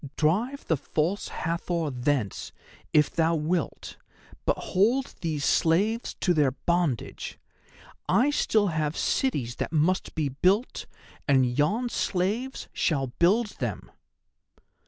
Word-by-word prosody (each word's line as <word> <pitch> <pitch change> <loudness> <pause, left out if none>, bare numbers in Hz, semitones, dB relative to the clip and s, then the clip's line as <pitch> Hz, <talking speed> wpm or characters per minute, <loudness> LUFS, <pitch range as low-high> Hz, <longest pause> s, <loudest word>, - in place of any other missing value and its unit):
Drive 220 - +1
the 160 - +1
False 165 +8 -1
Hathor 170 -1 -2
thence 125 -5 -1 0.4
if 150 -2 +4
thou 165 0 +2
wilt, 160 +2 -2 0.5
but - - +2
hold 235 +8 +1
these 155 -4 -1
slaves 205 +8 +2
to 180 - +1
their 150 -4 +3
bondage. 170 - -2 0.7
I 270 +5 +4
still 215 -7 +2
have 155 -1 -1
cities 130 - 0
that - - -3
must 165 +4 +1
be 150 -3 0
built, 185 - +1 0.4
and 130 -3 +3
yon 210 - +1
slaves 215 +8 -2
shall 135 -7 0
build 205 +5 +2
them." - - -4
170 Hz, 115 wpm, -27 LUFS, 150-205 Hz, 0.7 s, if